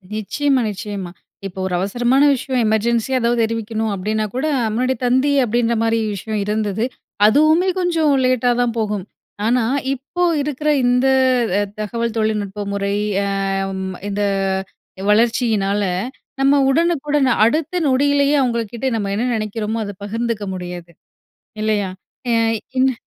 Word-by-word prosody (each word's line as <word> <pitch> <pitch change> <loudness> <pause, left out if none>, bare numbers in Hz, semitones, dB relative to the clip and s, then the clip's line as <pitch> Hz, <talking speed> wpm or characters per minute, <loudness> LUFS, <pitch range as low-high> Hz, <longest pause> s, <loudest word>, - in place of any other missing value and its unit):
நிச்சயமா, 265 +5 0
நிச்சயமா. 200 -3 -5 0.4
இப்போ 190 0 -9
ஒரு 185 - -3
அவசரமான 245 +8 +2
விஷயம், 260 -1 -1
எமர்ஜென்சியா 235 +4 +1
எதாவது 235 0 +2
தெரிவிக்கணும் 225 -1 -2
அப்படீன்னாக்கூட, 215 +7 -2 0.3
முன்னாடி 255 +3 +1
தந்தி 260 +4 +3
அப்படீன்ற 235 0 +1
மாரி 225 0 +2 0.2
விஷயம் 215 +2 -3
இருந்தது. 210 0 -1 0.4
அதுவுமே 310 - +4
கொஞ்சம் 330 -4 +2
லேட்டாதான் 245 -1 +2
போகும். 210 -3 -2 0.4
ஆனா, 240 +1 +2 0.3
இப்போ 280 +7 -4 0.2
இருக்கிற 300 +1 -2 0.2
இந்த 250 +2 +3 0.5
அ - - +2 0.2
தகவல் 230 +2 -2
தொழில்நுட்ப 210 -2 -1
முறை 200 0 -1 0.7
அம் 190 -1 -4 0.2
இந்த 205 +1 -1 0.9
வளர்ச்சியினால, 215 -3 +2 0.6
நம்ம 280 +1 +4
உடனுக்குடன் 295 -3 +2 0.2
அடுத்த 320 +7 0
நொடியிலேயே 285 +2 +3
அவுங்கள்க்கிட்ட 235 0 -1
நம்ம 200 -3 -2
என்ன 230 - 0
நெனைக்கிறோமோ, 215 +1 -3
அத 205 - -6
பகிர்ந்துக்க 225 0 -2
முடியறது, 175 -1 -7 0.7
இல்லையா? 205 -3 0 0.4
ஏய் 225 -1 +1 0.2
இன்னு 260 0 +4
230 Hz, 115 wpm, -19 LUFS, 210-260 Hz, 0.9 s, அதுவுமே